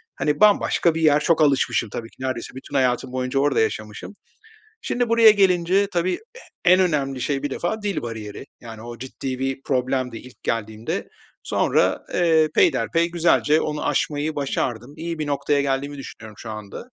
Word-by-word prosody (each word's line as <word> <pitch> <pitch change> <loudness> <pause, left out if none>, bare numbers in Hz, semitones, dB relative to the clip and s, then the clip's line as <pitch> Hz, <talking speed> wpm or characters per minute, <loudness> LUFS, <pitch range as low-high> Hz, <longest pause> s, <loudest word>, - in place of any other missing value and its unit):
hani, 150 -1 -1
bambaşka 200 -5 +4
bir 165 - -2
yer. 150 -2 +5
Çok 160 +1 +2
alışmışım 135 -5 +2
tabii 115 +2 -6
ki, - - -25
neredeyse 130 -2 -4
bütün 135 +2 -9
hayatım 125 -1 +1
boyunca 130 +1 -1
orada 145 0 +2
yaşamışım. 110 - -3 0.7
Şimdi 245 - -1
buraya 230 -1 +7
gelince 190 -1 +3
tabii 180 +1 +1
e 465 +2 -12 0.3
en 185 - +5
önemli 140 -7 0
şey 140 +1 -1
bir 145 - -2
defa 205 +10 -3
dil 200 -5 -2
bariyeri, 110 +1 -7
yani, 115 -2 -10
o 120 0 -8
ciddi 130 0 -5
bir 135 0 -3
problemdi 130 -3 -1
ilk 125 +1 -15
geldiğimde. 110 0 -3 0.3
Sonra, - - +1
eee, 160 -3 +3
peyderpey 170 - +2
güzelce 165 -2 +3
onu 150 0 -3
aşmayı 150 +1 -1
başardım. 130 -2 -3
İyi 165 0 -5
bir 155 - -2
noktaya 145 0 +1
geldiğimi 140 +1 -2
düşünüyorum 110 -5 -10
şu 115 - -8
anda 105 - -8
140 Hz, 165 wpm, -22 LUFS, 125-170 Hz, 0.7 s, buraya